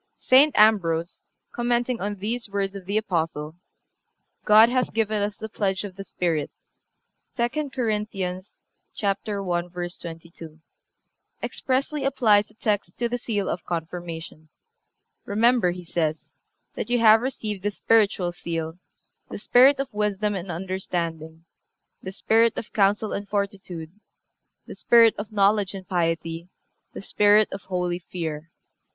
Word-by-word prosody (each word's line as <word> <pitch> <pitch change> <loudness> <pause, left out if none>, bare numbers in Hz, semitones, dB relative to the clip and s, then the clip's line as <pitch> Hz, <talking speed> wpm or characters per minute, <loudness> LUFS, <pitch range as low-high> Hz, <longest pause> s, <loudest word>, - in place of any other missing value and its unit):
"(361) 265 +3 +6
St. 305 - -8
Ambrose, 175 -6 +3 0.3
commenting 240 0 -1
on 205 +1 -2
these 220 +3 -4
words 195 -1 -2
of 195 -2 -9
the 200 +2 0
Apostle, 160 -7 -2 0.9
"God... 215 +2 +7
hath 250 -1 -1
given 215 -2 0
us 205 0 -2
the 220 - -6
pledge 195 -3 -2
of 195 -3 -8
the 195 - -7
Spirit," 165 -6 -2 0.9
(II. 265 +5 -1
Cor. 250 -4 -1
i. 210 0 0
22) 185 -2 -5 2.9
expressly 275 +2 -1
applies 220 -7 +3
the 215 - -24
text 205 -6 -2
to 240 - 0
the 245 +1 -3
seal 205 -5 -2
of 170 - -3
Confirmation. 165 -2 -6 0.8
"Remember," 230 -1 +3
he 180 0 -6
says, 160 -2 -2 0.4
"that - - -5
you 245 - +2
have 225 -1 +6
received 215 -6 -4
the 205 - 0
spiritual 205 -4 +2
seal, 165 -1 -5 0.5
the - - -6
spirit 270 +3 +5
of 275 -4 -4
wisdom 210 0 0
and 190 -1 -5
understanding, 170 -3 -4 0.6
the 190 - -6
spirit 225 +3 +2
of - - -6
counsel 205 +1 +2
and 200 0 -5
fortitude, 195 -5 -4 0.7
the - - -9
spirit 230 -2 +5
of 205 +1 -6
knowledge 200 -1 +2
and 190 -2 -9
piety, 165 -1 -2 0.4
the - - -9
spirit 210 +1 +4
of 195 - -6
holy 180 -2 -2
fear. 165 -3 -6
200 Hz, 135 wpm, -24 LUFS, 175-225 Hz, 2.9 s, God